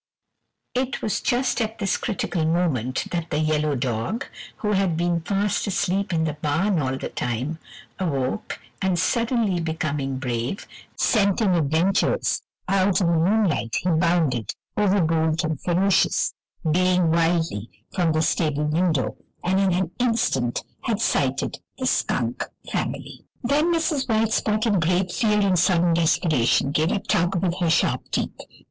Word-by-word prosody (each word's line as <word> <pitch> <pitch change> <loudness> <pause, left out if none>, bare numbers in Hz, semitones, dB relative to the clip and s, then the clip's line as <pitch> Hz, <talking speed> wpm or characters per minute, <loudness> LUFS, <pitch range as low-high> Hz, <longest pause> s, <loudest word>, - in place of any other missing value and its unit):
It 255 +1 -2
was 215 - -1
just 255 0 +1
at 220 0 -2
this 195 -3 0
critical 190 -6 -2
moment 155 -7 0
that 170 -2 -2
the - - -1
yellow 155 -1 +1
dog, 125 - -2 0.3
who 210 - -1
had 190 -5 +1
been 170 0 0
fast 200 +4 0
asleep 195 0 0
in 160 -2 +1
the 155 -2 -1
barn 160 +6 0
all 130 -1 -1
the - - -5
time, 130 +7 -3 0.4
awoke 145 +2 -2 0.2
and, 190 -2 +1
suddenly 230 0 +1
becoming 150 -4 -2
brave, 125 - -3 0.3
scenting 200 -2 +2
adventures, 165 +5 +1 0.3
out 195 +1 +2
in 170 -3 +2
the - - +2
moonlight, 175 - +1
he 180 - 0
bounded, 160 - +1 0.2
overbold 165 -5 +2
and 155 -3 -2
ferocious, 185 +2 +2 0.4
baying 180 0 +3
wildly, 165 - +1 0.2
from 175 -3 +1
the 155 0 +1
stable 150 -2 0
window, 155 -2 +1 0.3
and 190 +2 +2
in 195 -1 +3
an 180 -1 0
instant 230 - +1 0.2
had 225 -4 -1
sighted - - 0 0.2
the - - -3
skunk - - 0 0.3
family. - - -4 0.2
Then 295 +7 +2
Mrs. 320 -5 0
White 220 0 +2
Spot 215 +1 +1
in 205 -5 +2
great 180 +2 +1
fear 210 -1 +2
and 190 -3 +3
sudden 170 -1 +3
desperation 155 -6 +2
gave 155 +4 +1
a - - +1
tug 175 -1 0
with 180 0 -1
her 175 -2 +1
sharp 170 - +1
teeth. - - -2
175 Hz, 145 wpm, -23 LUFS, 155-200 Hz, 0.4 s, baying